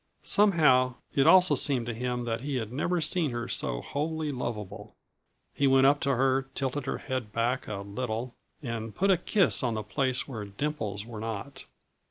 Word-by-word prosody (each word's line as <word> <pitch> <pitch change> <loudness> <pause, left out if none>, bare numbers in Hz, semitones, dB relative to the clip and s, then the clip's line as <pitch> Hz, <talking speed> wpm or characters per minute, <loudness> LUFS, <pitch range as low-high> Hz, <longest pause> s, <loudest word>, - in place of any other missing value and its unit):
Somehow, 150 -11 +4 0.2
it 135 - +3
also 185 0 +7
seemed 130 -5 +1
to 120 - -3
him 125 +1 -3
that 115 -1 -2
he 140 0 -3
had 115 -2 -3
never 170 +5 0
seen 155 0 +1
her 120 -1 -4
so - - -1
wholly 155 +1 -2
lovable. 105 -6 -6 0.6
He 140 - +2
went 135 0 +5
up 145 +1 +5
to 140 -1 +1
her, 135 +1 +1
tilted 135 0 -2
her - - -1
head 130 -6 -4
back 120 +3 -1
a 100 -2 -4
little, 115 +3 -4 0.3
and 115 -3 -5
put 195 +1 +2
a - - +6
kiss 190 +2 +2
on 120 -4 -1
the 110 - -3
place 130 +3 -1
where 110 -7 -6
dimples 105 -2 -4
were 115 -2 -8
not. 115 +5 -6
130 Hz, 185 wpm, -28 LUFS, 115-145 Hz, 0.6 s, also